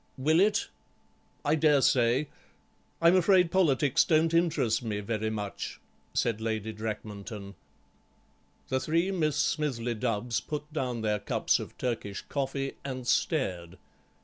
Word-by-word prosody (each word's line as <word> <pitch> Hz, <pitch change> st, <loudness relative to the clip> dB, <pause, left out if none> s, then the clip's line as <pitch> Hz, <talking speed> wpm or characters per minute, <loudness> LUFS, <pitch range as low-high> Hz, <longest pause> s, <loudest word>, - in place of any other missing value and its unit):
"Will 155 Hz, +5 st, +3 dB
it? 205 Hz, +2 st, +3 dB, 0.8 s
I 145 Hz, -, +3 dB
dare 150 Hz, -3 st, +4 dB
say. 125 Hz, +3 st, +3 dB, 0.8 s
I'm 170 Hz, +2 st, +7 dB
afraid 180 Hz, -1 st, +4 dB
politics 150 Hz, -6 st, +3 dB
don't 160 Hz, 0 st, +2 dB
interest 165 Hz, -10 st, +2 dB
me 110 Hz, -4 st, -3 dB
very 110 Hz, +1 st, -2 dB
much," 105 Hz, -2 st, -5 dB, 0.4 s
said 115 Hz, -2 st, 0 dB
Lady 110 Hz, -1 st, -2 dB
Drakmanton. 105 Hz, -1 st, -6 dB, 1.2 s
The 130 Hz, -, +1 dB
three 165 Hz, +7 st, +1 dB
Miss 155 Hz, -6 st, 0 dB
Smithly 130 Hz, -6 st, 0 dB
Dubbs 115 Hz, 0 st, -1 dB
put 150 Hz, 0 st, -6 dB
down 125 Hz, -6 st, -2 dB
their 105 Hz, -1 st, 0 dB
cups -, -, +1 dB
of -, -, -8 dB
Turkish 110 Hz, -5 st, -3 dB
coffee 135 Hz, -1 st, -3 dB
and 130 Hz, -2 st, -5 dB
stared. 95 Hz, -, 0 dB
130 Hz, 125 wpm, -29 LUFS, 110-155 Hz, 1.2 s, I'm